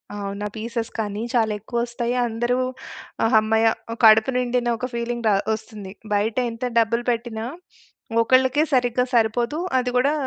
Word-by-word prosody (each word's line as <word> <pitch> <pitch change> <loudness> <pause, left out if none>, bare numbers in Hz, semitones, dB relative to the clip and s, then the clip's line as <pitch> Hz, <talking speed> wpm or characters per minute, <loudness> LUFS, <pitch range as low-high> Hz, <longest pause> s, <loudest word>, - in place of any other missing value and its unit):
అవును. 200 0 -5
ఆ - - -7
పీసెస్ 230 +1 -4
కానీ 210 -1 -3
చాలా 225 -3 +2
ఎక్కువోస్తాయి. 235 +2 -2
అందరూ 240 +2 -1 0.7
ఆ - - +4
హమ్మయ్య 220 +1 +3 0.4
కడుపు 220 +3 +7
నిండిన 245 -1 0
ఒక 255 - -3
ఫీలింగ్ 235 0 -3
ద - - +5 0.2
ఒస్తుంది. 210 -3 -8 0.2
బయటెంత 230 +3 -1 0.2
డబ్బులు 230 +1 +1
పెట్టినా, 230 -1 -4 0.8
ఒకళ్ళకే 260 +4 +3
సరిగ్గా 250 -1 +2
సరిపోదు. 235 +5 +1 0.2
అది 250 0 -1
కూడా 280 +4 +2
235 Hz, 135 wpm, -22 LUFS, 220-245 Hz, 0.8 s, కడుపు